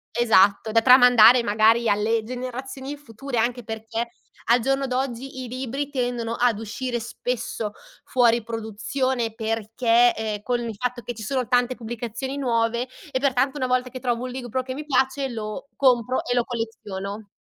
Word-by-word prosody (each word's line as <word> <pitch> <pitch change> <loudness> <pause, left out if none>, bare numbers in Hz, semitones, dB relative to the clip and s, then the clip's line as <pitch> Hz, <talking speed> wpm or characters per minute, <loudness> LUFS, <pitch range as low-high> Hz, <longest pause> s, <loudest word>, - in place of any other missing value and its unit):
Esatto, 220 -2 +4
da 230 0 +4
tramandare 245 -2 +8
magari 225 +1 +3
alle 215 +2 +2
generazioni 260 +3 -6
future 250 -1 -5
anche 240 +1 0
perché 225 +2 -4 0.3
al 235 +2 +4
giorno 270 +3 0
d'oggi 260 0 -3
i - - -6
libri 265 +3 -4
tendono 245 -4 -2
ad 240 -3 +2
uscire 240 +3 -3
spesso 230 -2 -4 0.3
fuori 235 -3 +3
produzione 225 +2 -2
perché, 225 +2 +2
ehm, 215 -2 -4
con 245 -1 0
il 230 -3 -4
fatto 250 +2 -3
che 240 -1 -6
ci 220 - -8
sono 255 +1 -1
tante 245 0 +2
pubblicazioni 240 +3 -5
nuove 235 -1 0 0.2
e 260 - -1
pertanto 270 +1 +1
una 260 - -1
volta 255 0 0
che 255 0 -8
trovo 245 -1 -1
un - - -4
libro 255 0 -3
che 255 0 -6
mi 300 +1 -6
piace 265 0 +1
lo 215 +2 -6
compro 255 -2 +2
e 245 - -1
lo 240 - +3
colleziono. 215 -3 -5
240 Hz, 160 wpm, -24 LUFS, 225-255 Hz, 0.3 s, tramandare